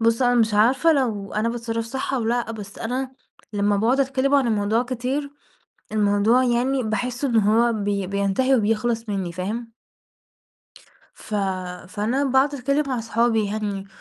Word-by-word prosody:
بُص 230 Hz, +2 st, +2 dB
هو 245 Hz, -, +4 dB
أنا 245 Hz, -, +4 dB
مش 220 Hz, -1 st, +1 dB
عارفة 255 Hz, +10 st, +4 dB
لو 220 Hz, -9 st, -1 dB
أنا 215 Hz, +2 st, +1 dB
باتصرف 230 Hz, -1 st, -3 dB
صح 265 Hz, +3 st, -3 dB
أو 245 Hz, -4 st, -1 dB
لأ، 235 Hz, 0 st, 0 dB
بس 205 Hz, -2 st, -9 dB
أنا 260 Hz, +3 st, -3 dB, 0.4 s
لمّا 205 Hz, 0 st, +1 dB
باقعد 235 Hz, +7 st, +2 dB
أتكلم 270 Hz, +1 st, +1 dB
عن 275 Hz, -3 st, +4 dB
الموضوع 215 Hz, +1 st, +1 dB
كتير، 255 Hz, +3 st, -3 dB, 0.6 s
الموضوع 215 Hz, +3 st, +3 dB
يعني 255 Hz, +2 st, +1 dB
باحس 245 Hz, +4 st, -3 dB
إن 245 Hz, -4 st, 0 dB
هو 225 Hz, +3 st, +3 dB
بي 200 Hz, -3 st, -2 dB
بينتهي 200 Hz, +7 st, +1 dB
وبيخلص 225 Hz, 0 st, 0 dB
منّي، 190 Hz, -4 st, -2 dB
فاهم؟ 220 Hz, +6 st, -4 dB, 1.4 s
ف 215 Hz, -, -8 dB, 0.5 s
فأنا 220 Hz, +8 st, -1 dB
باقعد 270 Hz, +2 st, +2 dB
أتكلم 280 Hz, +3 st, 0 dB
مع 255 Hz, -3 st, -1 dB
صحابي 225 Hz, -1 st, +1 dB
يعني 200 Hz, -1 st, -3 dB
230 Hz, 155 wpm, -23 LUFS, 210-255 Hz, 1.4 s, هو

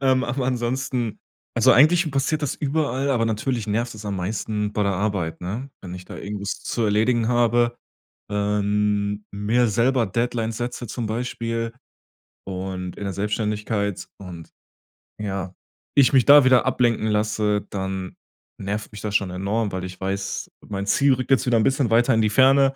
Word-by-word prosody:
Ähm, 130 Hz, -2 st, +3 dB
aber 125 Hz, +1 st, -2 dB
ansonsten 125 Hz, -2 st, -2 dB, 0.4 s
also 120 Hz, +3 st, +6 dB
eigentlich 160 Hz, +4 st, +5 dB
passiert 140 Hz, +3 st, 0 dB
das 145 Hz, -, -1 dB
überall, 140 Hz, -2 st, -1 dB
aber 120 Hz, -4 st, +2 dB
natürlich 115 Hz, +1 st, -1 dB
nervt 115 Hz, +3 st, -1 dB
es 110 Hz, 0 st, -10 dB
am 100 Hz, -1 st, -3 dB
meisten 105 Hz, +2 st, -2 dB
bei 105 Hz, -, +1 dB
der 100 Hz, -1 st, +1 dB
Arbeit, 95 Hz, -4 st, -2 dB
ne? 110 Hz, +10 st, -5 dB
Wenn 90 Hz, -2 st, -8 dB
ich 90 Hz, 0 st, -9 dB
da -, -, -10 dB
irgendwas 100 Hz, 0 st, -5 dB
zu 120 Hz, -, -2 dB
erledigen 110 Hz, +2 st, +2 dB
habe 120 Hz, 0 st, +2 dB, 0.5 s
ähm, 105 Hz, 0 st, 0 dB
mir 110 Hz, +5 st, +2 dB
selber 120 Hz, +3 st, +2 dB
Deadlines 115 Hz, +1 st, -1 dB
setze 120 Hz, 0 st, -4 dB
zum 115 Hz, +1 st, -3 dB
Beispiel 115 Hz, 0 st, -3 dB, 0.7 s
und 95 Hz, -1 st, -5 dB
in -, -, -6 dB
der 100 Hz, -, -3 dB
Selbstständigkeit 105 Hz, 0 st, -2 dB
und, 90 Hz, -4 st, -9 dB, 0.7 s
ja 95 Hz, -3 st, -4 dB, 0.4 s
ich 140 Hz, -3 st, +6 dB
mich 130 Hz, -3 st, +5 dB
da 145 Hz, 0 st, +9 dB
wieder 130 Hz, -1 st, +5 dB
ablenken 120 Hz, -4 st, +1 dB
lasse, 105 Hz, -1 st, 0 dB
dann 95 Hz, -1 st, -4 dB, 0.4 s
nervt 105 Hz, +2 st, -4 dB
mich 105 Hz, -, -8 dB
das 105 Hz, -1 st, -3 dB
schon 100 Hz, -3 st, +2 dB
enorm, 100 Hz, +4 st, -1 dB
weil 95 Hz, -1 st, -4 dB
ich 90 Hz, 0 st, -9 dB
weiß, 100 Hz, +1 st, -3 dB, 0.2 s
mein 100 Hz, -1 st, -4 dB
Ziel 140 Hz, +5 st, +4 dB
rückt 130 Hz, 0 st, -3 dB
jetzt 135 Hz, 0 st, +4 dB
wieder 120 Hz, -2 st, +3 dB
'n 110 Hz, -, +3 dB
bisschen 135 Hz, -1 st, +2 dB
weiter 120 Hz, +3 st, +4 dB
in 110 Hz, -, +3 dB
die 110 Hz, -, +2 dB
Ferne. 135 Hz, +3 st, +5 dB
110 Hz, 170 wpm, -23 LUFS, 100-125 Hz, 0.7 s, da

